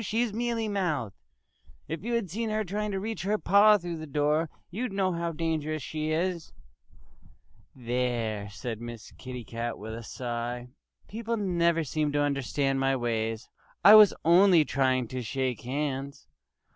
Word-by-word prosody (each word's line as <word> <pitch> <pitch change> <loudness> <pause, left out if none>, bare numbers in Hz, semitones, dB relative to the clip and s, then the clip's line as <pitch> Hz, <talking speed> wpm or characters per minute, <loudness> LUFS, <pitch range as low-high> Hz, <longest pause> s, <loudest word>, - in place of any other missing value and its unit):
She's 225 +1 0
mealy 230 0 -1
mouthed.... 160 - -1 0.7
If 165 +2 -5
you 240 +2 -2
had 230 -4 -1
seen 220 +6 -3
her 215 0 0
trying 210 +2 -3
to 195 -1 -2
reach 220 +3 -4
her 205 +4 0
paw 210 +1 +6
through 175 -3 -5
the 155 0 -7
door 150 +3 +1 0.2
you'd 230 +5 -3
know 195 -1 +1
how 170 -1 -2
dangerous 155 -2 -2
she 155 +1 -3
is." 170 +1 -2 1.2
"There!" 120 -4 -2
said 110 +2 -6
Miss 120 -2 -8
Kitty 125 -2 -7
Cat 115 +2 -4
with 110 +1 -7
a 115 - -6
sigh. 120 +1 -5 0.4
"People 230 +2 -3
never 170 -4 +1
seem 150 0 -1
to 145 - +1
understand 140 -1 0
my 135 0 +2
ways. 115 -2 -2 0.4
I 205 - +11
was 215 -2 +9
only 175 -1 +6
trying 130 -3 +1
to 130 0 -4
shake 125 0 -2
hands!" 140 +1 -4
155 Hz, 160 wpm, -28 LUFS, 125-195 Hz, 1.2 s, I